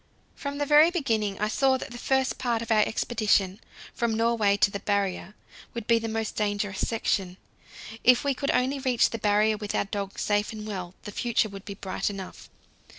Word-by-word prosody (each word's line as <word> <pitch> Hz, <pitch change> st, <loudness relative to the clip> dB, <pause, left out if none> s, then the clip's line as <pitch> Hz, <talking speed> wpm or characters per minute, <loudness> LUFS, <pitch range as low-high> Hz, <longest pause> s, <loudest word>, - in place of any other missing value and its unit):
From 280 Hz, 0 st, -5 dB
the 290 Hz, -, 0 dB
very 300 Hz, +3 st, +7 dB
beginning 225 Hz, -, -1 dB
I 210 Hz, -, +1 dB
saw 265 Hz, +4 st, +2 dB
that -, -, -8 dB
the 240 Hz, -, -8 dB
first 265 Hz, 0 st, 0 dB
part 235 Hz, -3 st, 0 dB
of 230 Hz, -, -6 dB
our 220 Hz, -, +5 dB
expedition, 210 Hz, -3 st, +1 dB, 0.3 s
from 235 Hz, -2 st, -1 dB
Norway 225 Hz, -3 st, +2 dB
to 205 Hz, 0 st, +3 dB
the 200 Hz, -, -4 dB
Barrier, 200 Hz, -1 st, -1 dB, 0.4 s
would 235 Hz, -2 st, -4 dB
be 230 Hz, 0 st, +4 dB
the 225 Hz, -, -4 dB
most 220 Hz, 0 st, -3 dB
dangerous 205 Hz, -2 st, -1 dB
section. 190 Hz, -5 st, -1 dB, 0.7 s
If 250 Hz, -1 st, +5 dB
we 280 Hz, -1 st, +1 dB
could 280 Hz, +2 st, -3 dB
only 265 Hz, +2 st, +1 dB
reach 255 Hz, -3 st, +2 dB
the 230 Hz, -, -4 dB
Barrier 210 Hz, +1 st, +2 dB
with 210 Hz, -1 st, -4 dB
our -, -, +1 dB
dogs 200 Hz, -1 st, -5 dB
safe 205 Hz, 0 st, +1 dB
and 215 Hz, -1 st, -7 dB
well, 185 Hz, -4 st, -6 dB
the 210 Hz, -, -7 dB
future 230 Hz, 0 st, 0 dB
would 195 Hz, 0 st, -10 dB
be 200 Hz, -, -6 dB
bright 190 Hz, +1 st, -3 dB
enough. 195 Hz, -2 st, -8 dB
215 Hz, 200 wpm, -27 LUFS, 200-240 Hz, 0.7 s, very